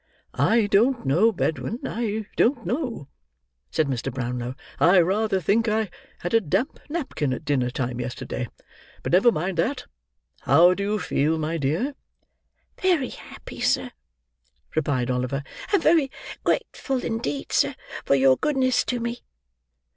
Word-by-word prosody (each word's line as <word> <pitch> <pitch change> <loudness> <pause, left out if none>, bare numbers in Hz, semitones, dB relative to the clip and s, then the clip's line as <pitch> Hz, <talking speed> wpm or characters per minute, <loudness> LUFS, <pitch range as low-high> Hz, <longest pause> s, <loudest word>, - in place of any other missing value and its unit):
"I 225 -1 +3
don't 230 - +2
know, 175 +12 +4
Bedwin. 195 +3 -2
I 220 -2 -2
don't 260 +5 +2
know," 245 - -3 0.6
said 155 - +1
Mr. 130 -4 -2
Brownlow; 125 0 -3 0.2
"I 180 +3 +6
rather 195 +3 +2
think 215 +7 +2
I 215 -3 0 0.3
had 175 - -3
a 225 - +5
damp 195 - -1
napkin 280 - -2
at 140 - -6
dinner 135 -5 +1
time 125 -1 -3
yesterday; 120 0 -4 0.6
but - - -3
never 190 +7 +6
mind 180 -1 -2
that. 255 +10 0 0.5
How 170 +7 +5
do 200 - -4
you 205 +2 0
feel, 160 -4 0
my 160 +1 -2
dear?" 160 - 0 0.9
"Very 345 -9 +2
happy, - - -11
sir," - - +1 0.8
replied 135 -5 0
Oliver. 125 +3 -1 0.3
"And 400 -5 +3
very 315 -4 +4 0.3
grateful 265 -3 -1
indeed, 145 - -3
sir, - - +2 0.3
for - - +3
your 135 -1 +5
goodness 260 -4 +2
to 245 - -1
me." 235 +1 -3
190 Hz, 140 wpm, -24 LUFS, 140-235 Hz, 0.9 s, I